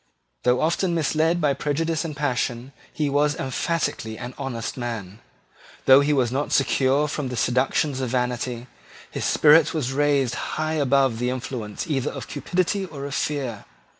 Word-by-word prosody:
Though 125 +1 +2
often 170 +2 +1
misled 160 +2 +1
by 150 -4 +2
prejudice 155 +4 -1
and 155 -4 -6
passion, 125 -2 -2 0.2
he 150 - -1
was 145 +1 +2
emphatically 130 -5 -2
an 125 +1 -7
honest 130 -5 -4
man. 115 -5 -5 0.7
Though 135 +1 +8
he 145 +1 +1
was 130 -5 +2
not 140 +3 -2
secure 135 +1 +2
from 150 -1 -3
the 125 -1 -5
seductions 130 +4 +1
of 130 - -2
vanity, 125 -1 -2 0.5
his - - -3
spirit 155 +1 +5
was 135 -4 -1
raised 140 -3 +2
high 155 +4 -2
above 135 -5 +2
the 125 +1 0
influence 120 -4 -4
either 140 -4 -1
of - - -7
cupidity 180 +7 -1
or 145 -7 -7
of 140 - -5
fear. 135 -8 -2
140 Hz, 160 wpm, -24 LUFS, 125-150 Hz, 0.7 s, Though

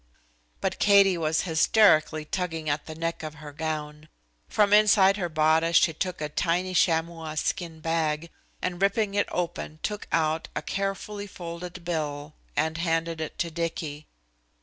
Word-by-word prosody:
But - - -2
Katie 200 -2 +6
was 160 -1 +1
hysterically 160 -2 +4
tugging 165 -2 -3
at 145 +1 -3
the 155 - -7
neck 165 +1 -3
of 155 -1 -6
her 150 -1 -10
gown. 155 0 -4 0.4
From 205 -1 +3
inside 210 -2 +6
her 175 -4 -2
bodice 160 +1 +2
she 165 - +4
took 180 +3 -3
a 150 - -1
tiny 175 +4 0
chamois 165 -2 +1
skin 160 +1 -2
bag, 165 0 -1 0.3
and 180 0 -2
ripping 200 +1 +2
it 205 0 +1
open 170 -3 -3
took 210 0 -3
out 160 0 +1
a - - -2
carefully 200 +1 -3
folded 175 -1 -8
bill 150 -3 -3 0.2
and 160 +1 0
handed 165 -1 -1
it 155 - -5
to 170 - -2
Dicky. 160 -2 -4
165 Hz, 150 wpm, -26 LUFS, 155-185 Hz, 0.4 s, Katie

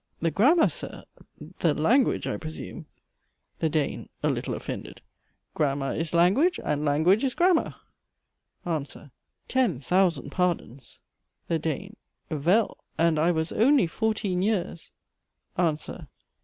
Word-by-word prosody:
The 165 0 0
grammar, 300 - +5
Sir? - - -7 0.6
The - - +2
language, 270 -2 +2
I - - -2
presume 155 -1 -8 0.7
THE 160 - +1
DANE. 150 -2 -2
(A - - +3
little - - -3
offended.) - - -7 0.5
Grammar 140 -2 0
is 165 +1 -2
language, 250 - +4
and 150 0 0
language 160 - +3
is 265 -2 0
grammar 350 -1 +2 0.9
ANSWER. 150 -4 -4 0.4
Ten 245 - +1
thousand 170 0 +1
pardons! 170 -8 -2 0.5
THE 165 - +1
DANE. 165 +7 -4 0.3
Vell, 175 +9 +2 0.2
and 165 -2 +3
I 165 +3 +3
was 160 -1 0
only 260 +2 +4
fourteen 200 0 -1
years 190 -5 -1 0.7
ANSWER. 160 -4 -2
170 Hz, 120 wpm, -26 LUFS, 155-215 Hz, 0.9 s, grammar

